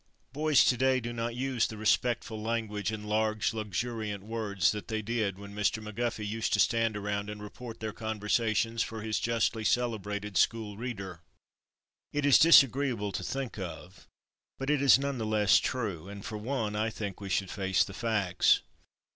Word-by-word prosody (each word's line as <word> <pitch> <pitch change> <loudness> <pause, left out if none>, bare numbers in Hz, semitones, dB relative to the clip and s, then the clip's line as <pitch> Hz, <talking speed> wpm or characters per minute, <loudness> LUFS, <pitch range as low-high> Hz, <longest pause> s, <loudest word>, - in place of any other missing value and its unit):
Boys 150 -1 +4
to 125 - +4
day 130 +1 +3
do 120 0 -5
not 115 0 -3
use 130 -2 0
the 110 - -8
respectful 110 0 0
language 110 -2 -2
and 105 -1 -6
large, 110 0 +1
luxuriant 110 -1 -3
words 105 -6 0
that 105 -4 -6
they 110 -1 -2
did 110 -3 -1
when 100 0 -10
Mr. 105 +1 +1
McGuffey 110 0 -3
used 110 +2 -2
to 105 - +2
stand 115 -1 +2
around 100 0 -3
and 105 0 -6
report 115 +3 -9
their 110 -1 -4
conversations 110 +1 0
for 110 -1 -4
his 110 -1 -1
justly 115 -1 0
celebrated 105 -4 -1
school 110 -3 +1
reader. 100 -7 -6 0.9
It 145 0 -1
is 145 - +7
disagreeable 135 -8 +5
to 95 - -4
think 130 +2 -4
of, 90 0 -8 0.5
but 135 +2 -1
it 150 -2 +2
is 140 -2 +7
none 140 -1 -3
the - - -2
less 105 -2 +4
true, 100 -8 -3
and 100 0 -9
for 105 -1 -5
one 110 -2 -2
I 110 +1 0
think 105 -3 -6
we 100 - -6
should 95 0 0
face 95 -2 +1
the 100 - -8
facts. 105 -5 +2
110 Hz, 175 wpm, -30 LUFS, 105-120 Hz, 0.9 s, is